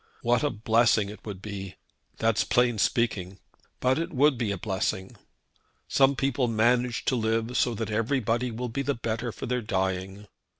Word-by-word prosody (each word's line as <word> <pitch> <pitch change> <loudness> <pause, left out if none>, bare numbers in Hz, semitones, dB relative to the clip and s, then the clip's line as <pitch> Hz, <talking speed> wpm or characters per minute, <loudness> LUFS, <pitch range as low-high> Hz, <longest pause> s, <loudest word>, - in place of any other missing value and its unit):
What 120 0 +3
a 145 - +2
blessing 110 -2 +2
it 105 - -10
would 100 -2 -7
be! 100 -2 -6 0.4
That's 115 -1 +2
plain 120 -3 +2
speaking; 100 -5 0 0.4
but 130 +3 +2
it 170 +2 -3
would 145 -1 +4
be 115 -3 -2
a 100 - -1
blessing! 95 -1 -2 0.7
Some 135 0 +4
people 135 -1 0
manage 120 +2 +1
to 130 - +2
live 115 +1 0
so 120 -2 +2
that 110 +1 -3
everybody 115 +1 0
will 120 +2 -4
be 125 +5 -2
the 140 0 -1
better 115 +1 -3
for - - -7
their 125 0 -1
dying. 95 -1 -2
115 Hz, 170 wpm, -27 LUFS, 105-125 Hz, 0.7 s, would